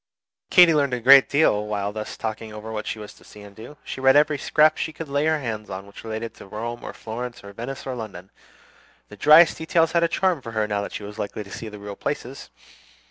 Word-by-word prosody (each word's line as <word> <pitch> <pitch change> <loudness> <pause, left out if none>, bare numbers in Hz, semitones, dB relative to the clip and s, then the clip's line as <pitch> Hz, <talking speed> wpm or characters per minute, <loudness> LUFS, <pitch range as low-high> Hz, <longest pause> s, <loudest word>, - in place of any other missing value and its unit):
Katy 175 -2 +7
learned 140 -4 +1
a - - -4
great 135 +3 +7
deal 105 -8 +2
while 105 -1 -2
thus 110 0 -6
talking 110 0 -5
over 105 +1 -8
what 110 -1 -5
she - - -3
was 105 -1 -9
to - - -20
see 105 - -14
and 100 -1 -13
do. 120 +8 -11
She 130 - -7
read 135 +1 +5
every 150 0 +3
scrap 155 +3 +3
she - - -3
could 160 0 -8
lay 140 +2 0
her 160 0 +2
hand 110 -6 -5
on 95 +1 -6
which 100 - -13
related 110 0 -5
to - - -12
Rome 115 +4 -6
or - - -6
Florence 120 +1 -7
or 100 0 -11
Venice 120 +6 -7
or 130 - -4
London. 100 -6 -8 0.8
The 105 - -11
driest 155 - +6
details 160 0 +1
had 170 - +2
a 170 - +3
charm 180 -2 0
for 115 -2 -8
her 110 -1 0
now 105 -1 -1
that 100 - -6
she - - -6
was 105 0 -9
likely 105 +1 -4
to 100 - -15
see 110 - -7
the 105 - -10
real 100 0 -8
places. - - -5
115 Hz, 245 wpm, -23 LUFS, 105-145 Hz, 0.8 s, Katy